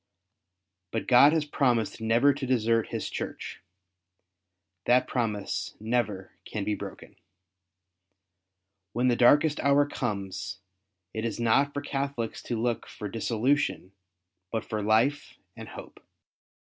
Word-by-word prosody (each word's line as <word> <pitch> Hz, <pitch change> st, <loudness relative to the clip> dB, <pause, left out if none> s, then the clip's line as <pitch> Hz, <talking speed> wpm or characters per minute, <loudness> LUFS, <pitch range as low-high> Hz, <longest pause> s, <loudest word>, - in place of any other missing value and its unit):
But 115 Hz, +4 st, -3 dB
God 130 Hz, +3 st, +7 dB
has 160 Hz, -2 st, +1 dB
promised 120 Hz, -8 st, 0 dB
never 115 Hz, +6 st, +4 dB
to 135 Hz, -1 st, -5 dB
desert 115 Hz, -2 st, +2 dB
His -, -, -4 dB
Church. -, -, -6 dB, 1.2 s
That 125 Hz, +1 st, +4 dB
promise 105 Hz, -5 st, -2 dB
never 110 Hz, -4 st, -1 dB
can 105 Hz, -, -4 dB
be 105 Hz, -, 0 dB
broken. -, -, -8 dB, 1.8 s
When 125 Hz, +2 st, +2 dB
the 120 Hz, -, +3 dB
darkest 145 Hz, +5 st, +5 dB
hour 140 Hz, +1 st, +4 dB
comes, 100 Hz, -8 st, -4 dB, 0.6 s
it 110 Hz, -, -3 dB
is 115 Hz, 0 st, -3 dB
not 135 Hz, +5 st, +3 dB
for 145 Hz, -, -4 dB
Catholics 135 Hz, -5 st, -3 dB
to 120 Hz, -, -1 dB
look 120 Hz, 0 st, -1 dB
for 105 Hz, -, -7 dB
dissolution, 115 Hz, 0 st, 0 dB, 0.6 s
but 110 Hz, -1 st, -2 dB
for 110 Hz, -1 st, -3 dB
life 115 Hz, +8 st, +1 dB, 0.2 s
and -, -, -9 dB
hope. -, -, -11 dB
120 Hz, 120 wpm, -28 LUFS, 110-140 Hz, 1.8 s, God